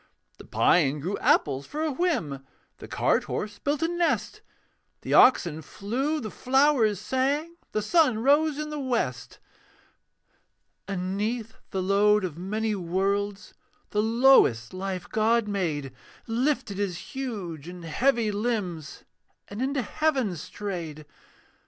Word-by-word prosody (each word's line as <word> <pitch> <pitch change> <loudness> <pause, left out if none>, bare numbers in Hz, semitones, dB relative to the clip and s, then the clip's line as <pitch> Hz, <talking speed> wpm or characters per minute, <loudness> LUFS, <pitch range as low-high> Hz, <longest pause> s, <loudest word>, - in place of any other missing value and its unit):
The - - -11
pine 150 -4 +3
grew 180 +8 -2
apples 140 -2 +2
for 305 +2 -3
a 315 - 0
whim, 215 - -1 0.3
The - - -10
cart - - +1
horse 205 -1 -4
built 290 +2 -1
a - - +3
nest; 345 0 -1 0.6
The - - -3
oxen 170 -11 +5
flew, 255 - -2
the 215 -6 -6
flowers 260 -6 +2
sang, 280 +9 -1
The 215 - -1
sun 300 -2 +3
rose 290 +5 +3
in 305 0 -4
the 300 - -4
west. 235 - -2 1.5
And 185 -1 -3
'neath 225 +2 -2 0.2
the 190 -1 -2
load 205 +2 +3
of 175 -5 -3
many 210 +5 -2
worlds, 195 +2 -2 0.4
The 210 - +1
lowest 225 - +4
life 185 -1 -4
God 225 +1 +2
made 155 -10 -2 0.3
Lifted 230 -4 -1
his 190 -4 -1 0.2
huge 200 - -5
and 175 -1 -9
heavy 230 - +1
limbs 200 -8 -3 0.5
And 205 +4 -6
into 270 0 0
heaven 265 - 0
strayed. 165 -3 -6
210 Hz, 130 wpm, -26 LUFS, 180-265 Hz, 1.5 s, oxen